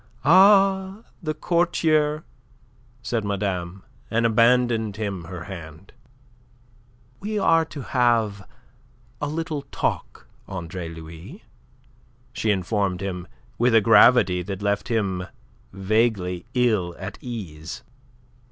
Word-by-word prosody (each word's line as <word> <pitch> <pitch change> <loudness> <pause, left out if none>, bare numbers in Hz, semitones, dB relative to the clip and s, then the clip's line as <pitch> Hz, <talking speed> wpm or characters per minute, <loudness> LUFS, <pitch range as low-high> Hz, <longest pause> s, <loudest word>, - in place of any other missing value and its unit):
"Ah, 195 +3 +5 0.2
the 155 -2 -3
courtier!" 155 -2 +1 0.8
said 115 -3 -1
madame, 95 -2 -3 0.3
and 115 +1 +1
abandoned 115 -2 +3
him 100 -5 -4
her 85 0 -7
hand. 85 -1 -10 1.3
"We 210 +1 -3
are 165 -5 +3
to 150 -2 -8
have 115 -5 +1 0.7
a 145 - -1
little 155 0 -3
talk, - - -3 0.2
Andre 90 -2 -6
Louis," 80 0 -11 0.9
she 110 - -1
informed 100 -1 0
him, 90 -2 -4 0.3
with 120 0 +3
a 110 - +7
gravity 105 -4 +5
that 95 +2 -6
left 100 0 0
him 95 -6 -1 0.4
vaguely 95 -3 0
ill 105 -9 +1
at - - -7
ease. 85 -11 -7
110 Hz, 105 wpm, -24 LUFS, 90-130 Hz, 1.3 s, a